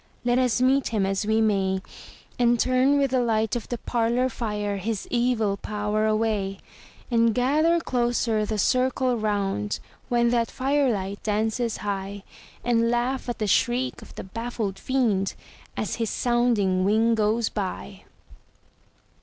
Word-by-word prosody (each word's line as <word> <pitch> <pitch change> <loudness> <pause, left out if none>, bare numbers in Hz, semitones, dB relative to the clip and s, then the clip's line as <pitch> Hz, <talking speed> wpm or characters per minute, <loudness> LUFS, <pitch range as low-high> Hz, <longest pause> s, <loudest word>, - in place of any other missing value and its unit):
Let 245 +1 +3
us 250 -4 +2
meet 265 +1 +3
him 210 -4 0
as 195 +2 -1
we 220 +1 +2
may, 195 -3 +1 0.6
And 240 -1 +3
turn 255 +3 +3
with 275 -2 +1
the 260 - +2
light 220 -2 +1
of 240 - -5
the 240 - -2
parlor 240 +2 0
fire 210 -4 -3
his 210 +1 -3
evil 235 -5 +1
power 210 +1 -1
away; 215 -3 0 0.5
And 230 -1 +3
gather 305 +7 +3
closer 240 -6 0
the 215 0 -2
circle 255 +3 +1
round, 200 - -1 0.3
when 235 -1 +3
that 235 -1 +1
fire 275 0 +1
light 200 -1 -4
dances 220 +2 -1
high, 200 0 -4 0.4
And 230 -1 +2
laugh 245 +2 -1
at 240 - -3
the 215 - -1
shriek 245 +5 +1
of - - -14
the - - -6
baffled 220 -1 -4
Fiend 220 -8 0 0.4
as 215 - -2
his 225 -2 -1
sounding 235 -7 +1
wing 220 +4 +3
goes 220 +1 +1
by! 195 0 -5
225 Hz, 145 wpm, -25 LUFS, 205-245 Hz, 0.6 s, Let